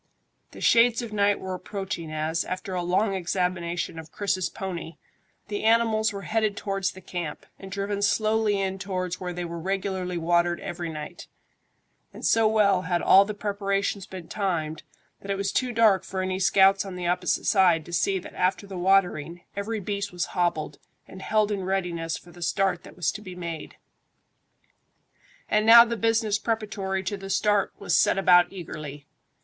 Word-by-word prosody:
The - - -12
shades 235 0 +4
of 225 -2 -7
night 205 -1 +2
were 190 0 -5
approaching 185 -3 -5
as, 155 +2 -1
after 185 +1 -5
a 180 - -1
long 190 +4 +1
examination 175 -2 -2
of 160 -1 -11
Chris's 195 -3 -1
pony, 170 -4 -6 0.5
the 205 -1 -4
animals 220 -1 +3
were 200 -1 -7
headed 215 -2 0
towards 195 -2 -2
the 190 - -12
camp, 175 -4 -6
and 195 0 -10
driven 200 +1 -2
slowly 215 0 +2
in 190 0 -2
towards 185 -2 -3
where 180 -1 -4
they 175 0 -4
were 170 0 -6
regularly 185 0 -2
watered 170 +1 +1
every 175 -1 -5
night; 150 -1 -8 0.8
and - - -8
so 225 -1 +4
well 205 -4 +3
had 175 -1 -1
all 195 +1 +7
the 210 0 -5
preparations 200 -1 -2
been 185 -3 -9
timed 170 -7 -2 0.4
that 200 - -12
it 195 - 0
was 195 0 -1
too 250 +4 0
dark 225 -5 +4
for 190 -1 -3
any 185 0 -2
scouts 195 +1 +4
on 195 -2 -7
the 180 -1 -5
opposite 180 +1 0
side 175 -6 +4
to 175 - -10
see 195 +3 +1
that 180 - -9
after 185 +1 0
the 195 -2 -7
watering, 175 -3 +1
every 215 +2 -3
beast 200 +1 -3
was 175 -1 -2
hobbled 165 -5 -1 0.3
and 190 - -11
held 215 0 +1
in 200 -2 -2
readiness 175 -4 -2
for 175 - -15
the 175 +1 -14
start 180 0 0
that - - -13
was 175 -3 0
to 210 - -8
be 185 -3 -9
made. 170 -3 -6 1.7
And 215 0 +2
now 235 +2 +9
the 235 0 -2
business 225 -2 +1
preparatory 205 -4 -2
to 200 +2 -3
the 195 0 -9
start 205 +1 +2
was 200 - 0
set - - +4
about 175 -2 +5
eagerly. 150 -6 -8
190 Hz, 180 wpm, -26 LUFS, 175-205 Hz, 1.7 s, now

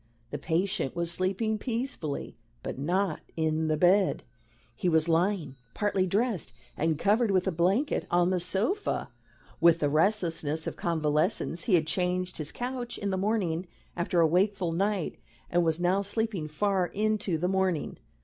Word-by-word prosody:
The 145 - -4
patient 165 -1 -1
was 170 -1 0
sleeping 195 +5 0
peacefully. 230 - -3 0.3
But - - -5
not 175 +3 0 0.2
in 160 0 +1
the 155 -1 +1
bed. 185 +4 +3 0.5
He 180 - 0
was 160 -1 +3
lying, 165 -4 +1 0.2
partly 195 -3 +1
dressed 210 -1 -1 0.2
and 160 0 0
covered 215 +6 +2
with 185 -2 +2
a 190 - +1
blanket, 185 - +1
on 175 +1 +3
the 185 - +1
sofa. 215 - -1 0.5
With 170 -1 +6
the 145 - +1
restlessness 160 -2 +1
of - - -4
convalescence 165 +2 0
he 195 - +4
had 160 -3 +2
changed 180 +2 -1
his 150 -2 -4
couch 245 -1 -4
in 200 -2 -2
the - - 0
morning 190 -4 0 0.3
after 175 0 0
a - - +6
wakeful 185 +1 +1
night, 195 0 -1 0.3
and 175 0 +3
was 160 0 +1
now 180 +3 +2
sleeping 200 -5 -2
far 185 +3 0
into 210 -4 0
the 175 +3 0
morning. 190 -4 0
180 Hz, 160 wpm, -28 LUFS, 160-200 Hz, 0.5 s, With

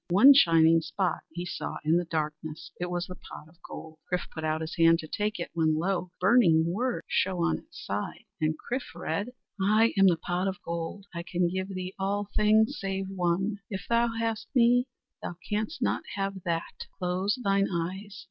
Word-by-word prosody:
One 210 +11 +9
shining 165 -8 +6
spot 185 +3 -1
he 175 +2 -5
saw 175 - -4
in 160 +2 +4
the 175 - 0
darkness. 155 -1 -4
It 180 0 -2
was 175 0 -2
the 185 - -8
pot 155 - -11
of 165 +2 -23
gold. 160 -1 -10
Chrif 180 0 -1
put 160 - -6
out 155 0 0
his 160 +1 -5
hand 165 0 +6
to 160 - -7
take 210 +3 -2
it, 170 - -4
when 160 -2 +2
lo! 180 +1 -1
burning 180 -6 +5
words 235 +9 -1
shone 185 -2 +1
on 170 - +2
its - - -13
side. - - -4 0.2
And 155 0 +1
Chrif 245 -5 -5
read: 175 +6 -2 0.3
"I 215 +4 +4
am 195 - +7
the 175 -3 +4
Pot 175 +3 -2
of 190 -1 -3
Gold; 170 +4 -4
I 170 - -4
can 175 0 0
give 190 +1 -2
thee 185 -1 -5
all 200 +1 -1
things 215 +1 +3
save 195 0 -3
one. 190 +2 0
If 195 -2 -5
thou 235 0 +3
hast 225 -1 -2
me, 245 +1 +5 0.3
thou 175 - -5
canst 215 +10 -2
not - - +1
have 195 -1 -3
that. 170 -1 -3
Close 185 +5 0
thine 195 -1 +3
eyes. 190 +4 -4
185 Hz, 195 wpm, -28 LUFS, 165-205 Hz, 0.3 s, One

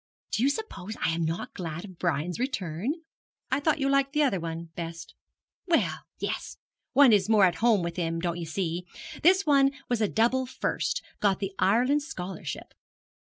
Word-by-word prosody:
'Do - - 0
you 270 - +4
suppose 280 - -5
I - - +1
am 165 0 -1
not 165 +2 -3
glad 170 0 -5
of 185 -4 -13
Brian's 170 +1 -1
return?' 245 - -2 0.5
'I 265 - +2
thought 310 +2 +2
you 275 - +1
liked 275 0 +2
the 300 0 +3
other 225 -10 +2
one 165 0 -5
best?' 165 0 -6 0.5
'Well, 340 -2 +2 0.2
yes; - - -4 0.4
one 275 -3 +7
is 205 0 +3
more 210 -3 +6
at 180 - +1
home 225 -6 +4
with 170 +1 -4
him, 165 -1 -1
don't 170 0 -2
you 165 - -5
see. 175 +1 -2 0.3
This 370 +4 +5
one 275 -2 +5 0.2
was 240 -2 +1
a 215 - +3
double 245 +5 +2
first - - -2 0.2
got 200 -2 +3
the 195 -1 -4
Ireland 250 +9 +3
Scholarship. 190 - -6
205 Hz, 180 wpm, -28 LUFS, 170-275 Hz, 0.5 s, one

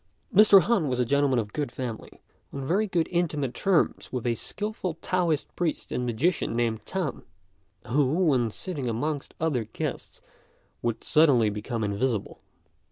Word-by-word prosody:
Mr. 205 -1 +8
Han 205 -10 +2
was 125 -2 -1
a 125 - +2
gentleman 140 +1 +2
of 105 -3 -2
good 145 -5 -2
family, 125 -3 -7 0.3
on 135 -1 -5
very 200 +9 +1 0.2
intimate 150 -7 0
terms 185 +4 +1
with 125 -2 -3
a 120 - +2
skilful 205 - -4
Taoist 170 -3 -1
priest 170 -3 -2
and 125 0 -1
magician 130 +4 0
named 115 -2 0
Tan, 180 -8 -3 0.6
who, 135 +3 +2
when 125 -7 +3
sitting 140 - -4
amongst 145 +5 -3
other 150 -8 0
guests, 110 - -5 0.6
would 115 -1 -2
suddenly 135 -9 +4
become 110 +2 -3
invisible. 105 +2 -2
135 Hz, 145 wpm, -27 LUFS, 120-165 Hz, 0.6 s, Mr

